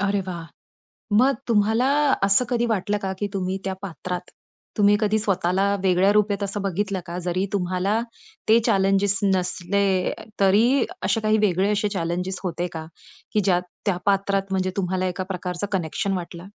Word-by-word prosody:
अरे 200 0 +1
वाह! 170 -3 -5 0.7
मग 260 +5 +5
तुम्हाला 220 +2 +3 0.4
असं 200 +5 +5
कधी 240 -1 +1
वाटलं 210 -2 0
का, 195 -1 -3
की 205 - -1
तुम्ही 190 -1 -2
त्या 190 0 -2
पात्रात. 180 -1 -5 0.5
तुम्ही 205 0 +5
कधी 215 0 +2
स्वतःला 195 -1 +1
वेगळ्या 190 +1 +3
रूपेत 205 -1 +1
असं 200 0 -2
बघितलं 195 0 -1
का? 170 +1 -5
जरी 185 +2 0
तुम्हाला 190 +2 0 0.5
ते 220 +1 +7
चॅलेंजस 195 -2 +3 0.2
नसले, 185 +1 0 0.3
तरी 225 +7 +4 0.2
असे 225 - +1
काही 215 0 +2
वेगळे 195 -1 +2
असे 210 0 +1
चॅलेंजस 180 +2 -2
होते 175 0 -2
का? 160 -1 -6 0.5
की 210 - +2
ज्या 180 -2 +3 0.3
त्या 195 - +2
पात्रात 195 0 +2
म्हणजे 185 -1 0
तुम्हाला 185 -1 -1
एका 185 +1 -3
प्रकारचं 180 +1 -4
कनेक्शन 190 +1 -1
वाटलं? 175 0 -7
195 Hz, 155 wpm, -23 LUFS, 180-205 Hz, 0.7 s, ते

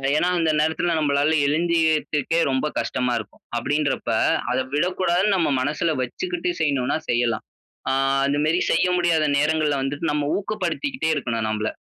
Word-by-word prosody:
ஏனா, 175 - +2
அந்த 165 -1 +2
நேரத்தில 160 +2 +1
நம்மளால 145 +1 +2 0.2
எழுந்திரிக்கிறதுக்கே, 160 -1 +1
ரொம்ப 130 +2 0
கஷ்டமா 125 -1 -1
இருக்கும், 105 - -11 0.2
அப்டின்றப்ப, 145 +3 -1 0.4
அத 125 - +1 0.2
விடக்கூடாதுனு 180 +4 +1
நம்ம 170 -5 +1
மனசுல 155 +4 0
வச்சுக்கிட்டு 355 - -3
செய்யணும்னா, 140 -2 +1
செய்யலாம். 120 -2 0 0.5
ஆ - - +2 0.3
அந்த 140 +1 0
மாரி 165 +3 +2
செய்ய 175 - +3
முடியாத 170 -3 +2
நேரங்கள்ல 150 -1 +1
வந்துட்டு, 145 +4 -2
நம்ம 150 -1 -1
ஊக்கப்படுத்திக்கிட்டே 205 - -2
இருக்கணும், 115 -5 -2
நம்பள. 110 0 -1
155 Hz, 135 wpm, -23 LUFS, 140-170 Hz, 0.5 s, செய்ய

